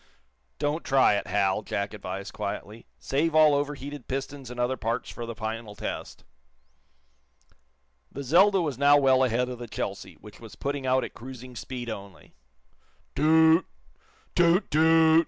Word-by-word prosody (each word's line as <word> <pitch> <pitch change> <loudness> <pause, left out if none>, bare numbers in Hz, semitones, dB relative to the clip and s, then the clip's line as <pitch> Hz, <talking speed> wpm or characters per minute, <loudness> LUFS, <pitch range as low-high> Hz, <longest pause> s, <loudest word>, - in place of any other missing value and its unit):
"Don't 150 +3 -1
try 135 -5 +4
it, 100 - -2
Hal," 100 0 +1
Jack 100 -1 -3
advised, 95 -1 -6
quietly. 105 +2 -6
"Save 155 +4 -1
all 155 -1 +6
overheated 145 -1 -3
pistons 135 0 -5
and 125 0 -8
other 125 +2 +1
parts 115 -2 -3
for 120 -1 -7
the 115 - -6
final 110 0 -5
test." - - -6 1.9
The 140 - -6
"Zelda" 190 +8 +4
was 145 -5 -3
now 145 +1 +6
well 130 -2 +4
ahead 125 0 +1
of 125 -1 -7
the 120 - -7
"Chelsea," - - -5
which - - -15
was - - -12
putting 140 -1 -3
out 130 +1 +2
at - - -7
cruising 125 0 -10
speed 125 0 -6
only. 100 -3 -9 0.8
Too 160 +3 +5 0.8
oot! 175 +3 +3
toot! 160 +1 +5
130 Hz, 150 wpm, -27 LUFS, 115-145 Hz, 1.9 s, all